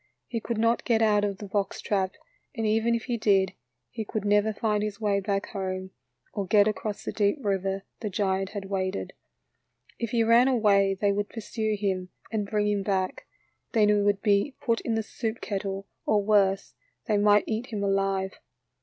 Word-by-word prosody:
He 230 - -3
could 230 0 -3
not 230 +1 +2
get 225 -2 +2
out 210 -1 +3
of 200 -2 -1
the 205 - -7
box 200 0 -2
trap, 190 -2 -1 0.4
and 225 -2 -2
even 225 +2 +2
if 230 - -3
he 245 -2 -2
did, 195 -4 +3 0.4
he 225 - -4
could 215 0 -4
never 205 +1 +3
find 210 0 0
his 210 -1 -3
way 205 -2 +1
back 200 0 -2
home, 190 -1 -4 0.4
or 200 -3 -3
get 205 0 +5
across 215 -1 -3
the - - -3
deep 205 +4 +1
river 195 -3 -1 0.2
the 215 - -3
giant 190 -1 0
had 200 -2 -6
waded. 190 0 -2 0.9
If 235 - -2
he 235 0 +2
ran 230 +3 +5
away 200 -6 +3
they 205 -1 +3
would 205 0 -1
pursue 220 -1 -2
him 190 -3 -1 0.2
and 210 -3 -2
bring 210 -1 +1
him 205 -1 +1
back, 190 -2 -2 0.5
then 215 -3 +4
he - - +5
would 205 -1 +2
be 205 +6 +2
put 230 -2 0
in 230 - -1
the 220 - 0
soup 225 +1 -4
kettle, 195 -1 -3 0.2
or 210 -1 +3
worse, 195 -2 +2 0.3
they 215 -3 +2
might 205 0 +5
eat 225 +3 -2
him 210 -3 -3
alive. 195 -1 0
205 Hz, 190 wpm, -27 LUFS, 195-220 Hz, 0.9 s, get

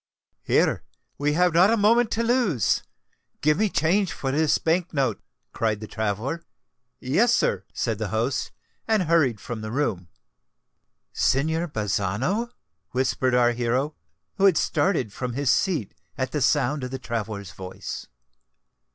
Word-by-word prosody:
"Here—we 145 +1 -1
have 180 +1 +3
not 180 +4 +6
a 230 - +3
moment 225 +3 +4
to 230 - 0
lose—give 180 - -1
me 215 -1 +2
change 180 +3 +1
for 135 - -3
this 155 +2 +2
bank 170 +1 0
note," 130 -6 0 0.3
cried 110 -2 0
the 110 - -6
traveller. 110 - -3 0.6
"Yes, 225 - +3
sir," - - 0
said - - -2
the - - -2
host, - - -1 0.4
and 220 -4 +3
hurried 155 - +2
from 120 -1 -6
the 110 - -5
room. 110 -9 -1 1.1
"Signor 160 +5 +1
Bazzano," 110 - -1 0.4
whispered 130 0 +1
our 120 -1 +4
hero, 125 +5 -1 0.4
who 195 - +3
had 185 -5 +5
started 135 - +1
from 125 -2 -4
his 140 0 +1
seat 160 - 0 0.2
at 130 -1 -2
the 150 - -2
sound 140 +1 +2
of 125 - -3
the 130 - -4
traveller's 110 -6 -4
voice. 90 +1 -7
140 Hz, 140 wpm, -25 LUFS, 115-180 Hz, 1.1 s, not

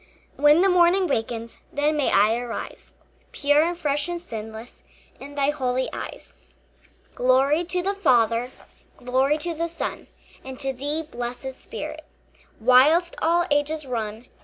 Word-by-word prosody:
When 295 +4 +5
the 390 - +4
morning 360 +1 +4
wakens, 230 -5 -3
Then 295 +2 +1
may 295 -3 +1
I 210 +3 +4
arise 240 -1 -6 0.4
Pure 290 +1 +3
and 345 +2 0
fresh 295 -2 -1
and 350 0 -3
sinless 220 -5 -9 0.4
In 285 +2 -10
thy 285 0 +2
holy 260 -3 -1
eyes. - - -8 0.8
Glory 270 +6 +3
to 360 +1 -2
the 395 +2 0
Father, 240 - +2 0.5
Glory 260 +4 +1
to 340 +2 -3
the 335 +1 -2
Son, 335 - -5 0.4
And 260 -1 -9
to 270 -1 -2
thee, 290 +5 -2
blessed 250 -2 -6
Spirit, - - -8 0.6
Whilst 280 +9 +5
all 345 +2 +2
ages 290 +1 +1
run. 225 -2 -4
280 Hz, 140 wpm, -24 LUFS, 245-320 Hz, 0.8 s, When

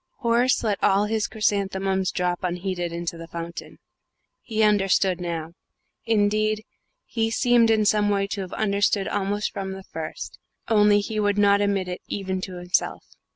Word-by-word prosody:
Horace 240 +1 +2
let 210 -3 -1
all 195 +2 +4
his 215 0 0
chrysanthemums 195 -3 0
drop 180 -1 -1
unheeded 180 -1 -2
into 170 0 -4
the 165 - -8
fountain. 170 0 -7 0.6
He 220 -2 -1
understood 195 -3 +2
now: 165 -2 -4 0.5
indeed, 215 0 +1 0.4
he 225 -1 -1
seemed 235 0 +3
in 220 -1 +3
some 205 0 +3
way 200 -1 +1
to 200 0 -4
have 185 -1 -7
understood 200 -1 +1
almost 205 +1 -1
from 190 -1 -4
the 190 0 -9
first, 160 -3 -7 0.3
only 210 -2 +4
he 215 +1 -3
would 205 -1 +1
not 200 0 +4
admit 200 -2 0
it 180 0 -5
even 190 -2 -3
to 185 -1 -6
himself. 180 0 -1
200 Hz, 155 wpm, -24 LUFS, 185-215 Hz, 0.6 s, all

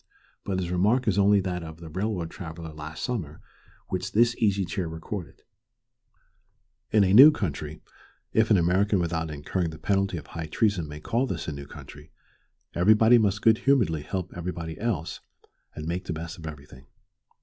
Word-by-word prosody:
But 95 -2 -2
his 90 -2 -2
remark 105 +8 +2
is 100 -1 +2
only 100 0 +5
that 90 -2 -3
of 80 -1 -9
the 85 - -9
railroad 95 -2 -2
traveller 80 -3 -8
last 75 +1 -7
summer 90 - -3 0.5
which 90 -1 -3
this 120 +2 +4
Easy 100 -3 +1
Chair 90 0 -3
recorded. 80 0 -7 1.5
In 105 -2 +4
a 95 0 +2
new 135 +8 +11
country 80 - -4 0.5
if 110 0 +3
an 105 - +5
American 95 +4 +2
without 85 -2 -1
incurring 80 +4 -2
the 80 - -9
penalty 95 +3 0
of 75 - -8
high 80 -2 -6
treason 100 -2 0
may 75 0 -8
call 120 +9 0
this 85 -8 -4
a - - -2
new 70 -1 -8
country - - -12 0.6
everybody 110 +6 +5
must 105 -1 0
good 110 0 +5
humoredly 115 - +2
help 90 +3 -5
everybody 85 -2 -5
else, 105 -9 -2 0.6
and 75 - -6
make 90 +3 -3
the 85 - -3
best 80 +3 -7
of 80 - -7
everything. 70 -3 -11
90 Hz, 170 wpm, -26 LUFS, 80-105 Hz, 1.5 s, new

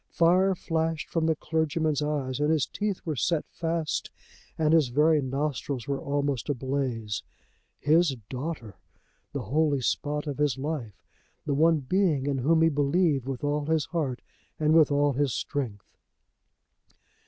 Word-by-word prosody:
Fire 185 +3 +3
flashed 160 -2 -2
from 165 -1 +1
the 160 - +2
clergyman's 155 -1 0
eyes, 145 -3 -2
and 150 +1 +2
his 155 -4 +2
teeth 205 -2 -3
were 155 -3 -2
set 160 +4 0
fast 165 -2 -2 0.5
and 155 -1 +2
his 160 -5 +5
very 150 +4 +3
nostrils 135 -1 -3
were 140 -1 -1
almost 140 -2 -1
ablaze. 130 -6 -2 0.6
His 155 -1 +3
daughter! 130 - -5 0.5
The 140 -3 -4
holy 145 +4 +1
spot 150 +4 -1
of 145 -2 -4
his 145 -3 +1
life! 135 -7 -5 0.4
The 145 - 0
one 160 +2 +3
being 155 -2 +1
in 140 -2 0
whom 160 +5 +3
he 165 - +5
believed 145 -1 +1
with 135 -1 -4
all 145 0 0
his 160 -3 +1
heart 145 -8 -3 0.4
and 155 0 +3
with 160 -2 +5
all 145 0 +3
his 140 -1 0
strength! 120 -9 -4
145 Hz, 150 wpm, -27 LUFS, 135-160 Hz, 0.6 s, his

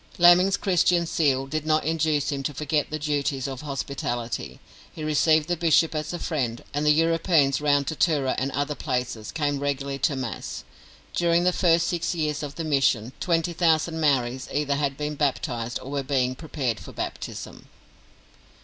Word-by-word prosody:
Laming's 180 +3 +6
Christian 180 -2 +2
zeal 140 -5 +1
did 155 +2 -3
not 155 -1 +1
induce 155 -2 +1
him 140 -1 -2
to 145 +1 -4
forget 150 +1 -1
the 155 - -3
duties 145 -3 -1
of 135 -2 -6
hospitality. 125 -5 -4 0.3
He 155 - -8
received 155 +1 +3
the 175 - 0
bishop 165 -1 +3
as 155 0 -3
a 175 - -3
friend, 125 -10 -2
and 145 +1 -1
the 150 - +3
Europeans 160 -3 +3
round 145 -1 +2
Tatura 150 -3 +1
and 135 - -1
other 145 +2 -1
places 125 -6 -3
came 145 -3 -1
regularly 140 -1 -2
to 140 - +1
Mass. 130 -4 -5 0.5
During 170 0 +2
the 180 0 +3
first 170 -2 +3
six 175 0 -1
years 155 -2 -1
of 145 -2 -6
the 165 - -4
mission, 135 -6 +1
twenty 170 -1 0
thousand 160 -1 +1
Maoris 130 -4 +1
either 145 0 0
had 140 -2 -1
been 150 0 -3
baptised 125 -5 -1
or 135 - -8
were 140 -1 -1
being 130 -2 0
prepared 130 -6 -3
for - - -11
baptism. - - -6
150 Hz, 170 wpm, -25 LUFS, 135-160 Hz, 0.5 s, Laming's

